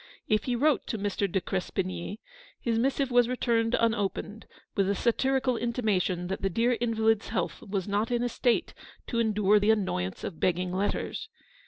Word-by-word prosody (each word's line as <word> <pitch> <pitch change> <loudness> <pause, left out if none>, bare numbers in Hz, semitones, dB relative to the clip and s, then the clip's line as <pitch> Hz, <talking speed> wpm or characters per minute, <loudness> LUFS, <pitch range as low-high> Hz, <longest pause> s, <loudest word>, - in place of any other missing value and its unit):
If 215 0 +1
he 250 - 0
wrote 290 +3 +2
to 225 - -2
Mr. 200 -1 -1
de 190 - +2
Crespigny, 185 +1 -3 0.4
his 230 -2 0
missive 270 +1 +1
was 245 -1 +4
returned 235 -2 +1
unopened, 220 -1 -1 0.3
with 195 -2 +1
a 200 - +1
satirical 255 +3 +1
intimation 215 -7 0
that 190 +2 -4
the 195 - +1
dear 230 +7 +2
invalid's 225 -2 +2
health - - -2
was 195 -2 -3
not 205 +2 0
in 240 -1 0
a 245 - 0
state 240 0 +1 0.3
to 235 - -2
endure 210 -2 +3
the 205 +1 +1
annoyance 185 - 0
of 160 - -5
begging 180 0 0
letters. 205 - -2
220 Hz, 170 wpm, -28 LUFS, 195-240 Hz, 0.4 s, was